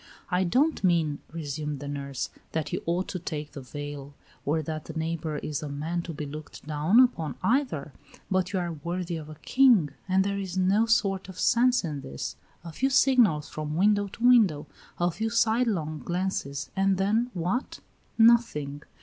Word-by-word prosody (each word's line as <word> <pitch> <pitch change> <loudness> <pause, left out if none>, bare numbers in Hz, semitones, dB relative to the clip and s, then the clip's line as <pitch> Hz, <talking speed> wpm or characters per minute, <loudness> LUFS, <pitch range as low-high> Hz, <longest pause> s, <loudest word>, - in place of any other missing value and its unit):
"I 180 +1 +2
don't 275 - +2
mean," 165 -5 +2
resumed 150 -2 -4
the 145 - -7
nurse, 140 -2 -4 0.2
"that 160 -2 -2
you - - -1
ought 175 +2 0
to 185 - -4
take 150 -3 -5
the 140 - -8
veil, 145 +1 -7 0.3
or 155 +2 +1
that 155 0 -5
the - - -7
neighbor 160 -1 -2
is 150 -1 -3
a 150 - -5
man 160 +5 -2
to 170 - -7
be 150 -1 -5
looked 150 +1 -9
down 155 +9 +3
upon 165 - +3
either; 225 - 0 0.4
but 185 0 +1
you 195 - -1
are 175 -2 -1
worthy 170 +3 -4
of 155 -1 -8
a 155 - -9
king, 240 - +5 0.2
and 190 +1 +4
there 200 0 -1
is 190 -2 -4
no 195 +5 +3
sort 195 -4 +1
of 185 - -9
sense 250 0 +3
in 150 -5 -4
this. 70 - -6 0.3
A 170 - -7
few 265 - 0
signals 240 - +4
from 155 0 -4
window 205 +2 +3
to 230 +5 0
window; 195 -12 +5 0.3
a 175 0 +2
few 220 +7 -2
sidelong 220 -9 +1
glances, 175 -6 -3
and 195 -1 +2
then 215 +6 +1
what? 180 +9 -2 0.4
Nothing. 225 -12 +3
175 Hz, 180 wpm, -27 LUFS, 150-205 Hz, 0.4 s, king